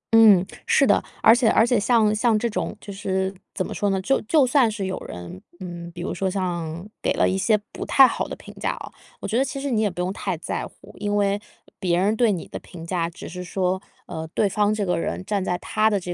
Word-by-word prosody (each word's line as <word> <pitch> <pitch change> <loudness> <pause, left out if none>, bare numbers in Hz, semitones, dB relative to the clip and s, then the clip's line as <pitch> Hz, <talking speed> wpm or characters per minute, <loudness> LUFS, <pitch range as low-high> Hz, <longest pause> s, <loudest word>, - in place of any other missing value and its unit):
嗯， 210 -5 +7 0.2
是 470 0 +5
的。 - - +3 0.2
而 225 - +8
且 240 -2 +3
而 225 - +5
且 240 -3 +2
像 220 -1 +3
像 220 0 +2
这 235 - 0
种 220 - -3
就 200 - -9
是， 190 -1 -1 0.2
怎 185 - -1
么 - - -6
说 205 - 0
呢？ 195 -1 +1
就 270 +8 +1
就 285 +5 +3
算 255 -2 +4
是 210 -2 -3
有 190 0 -2
人 90 +1 -8 0.2
嗯， 175 -2 -7
比 170 - -8
如 - - -3
说 190 -1 -1
像 175 -2 -3
给 - - +1
了 - - +2
一 185 - 0
些 200 +3 +3
不 - - -6
太 270 - +7
好 - - -1
的 - - -6
评 - - -13
价 - - 0
哦， - - -8 0.3
我 - - -4
觉 220 - -2
得 270 - +4
其 275 - -4
实 280 0 -3
你 220 -2 +2
也 210 - +2
不 180 -1 -5
用 180 +2 -1
太 190 -4 -3
在 - - -4
乎， - - -17
因 205 0 -1
为 200 0 +1 0.4
别 175 -3 +1
人 200 +4 +2
对 225 -1 +3
你 180 - -3
的 - - -7
评 165 -2 -11
价， 170 -1 -1
只 170 - -10
是 180 +1 -6
说， 185 +1 -1 0.2
呃， 160 0 -6
对 210 - +3
方 205 +1 +1
这 215 -1 -1
个 180 -2 0
人 185 - -3
站 200 -2 -1
在 180 -1 -1
他 215 +4 +1
的 205 -2 +1
200 Hz, 270 characters per minute, -23 LUFS, 180-220 Hz, 0.4 s, 而